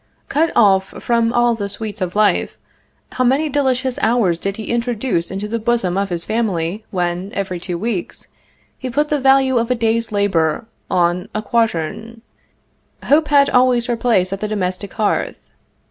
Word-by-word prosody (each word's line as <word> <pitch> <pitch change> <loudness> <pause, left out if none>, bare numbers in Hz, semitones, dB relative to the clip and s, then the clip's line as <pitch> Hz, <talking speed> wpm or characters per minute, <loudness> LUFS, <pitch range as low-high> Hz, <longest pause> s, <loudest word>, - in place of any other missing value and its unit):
Cut 320 +4 +1
off 195 -3 +3
from 235 -1 +2
all 240 0 +3
the 205 -3 -4
sweets 210 0 -6
of 180 0 -2
life, 210 0 +2 0.5
how 255 - -1
many 275 +5 +2
delicious 260 -2 0
hours 220 -7 +2
did 195 +2 -3
he 220 - -5
introduce 235 -6 -1
into 195 +2 -4
the 230 +2 -2
bosom 220 -5 0
of 200 0 -1
his 170 -2 -3
family 205 -3 -1
when, 180 +1 -2
every 185 -3 -3
two 175 0 -4
weeks, 205 -1 -4 0.5
he 260 - -4
put 295 +5 0
the 295 - +1
value 265 -1 +4
of 230 +1 -2
a 250 - +2
day's 230 -1 0
labor 190 -5 +1 0.2
on 175 0 +1
a 215 - -2
quatern. 225 0 -1 0.8
Hope 300 +2 +3
had 285 -1 +4
always 250 -1 +3
her 240 - -1
place 215 -6 +1
at 195 - -4
the 215 - -2
domestic 195 -1 -3
hearth. 215 -2 -1
220 Hz, 170 wpm, -18 LUFS, 190-245 Hz, 0.8 s, value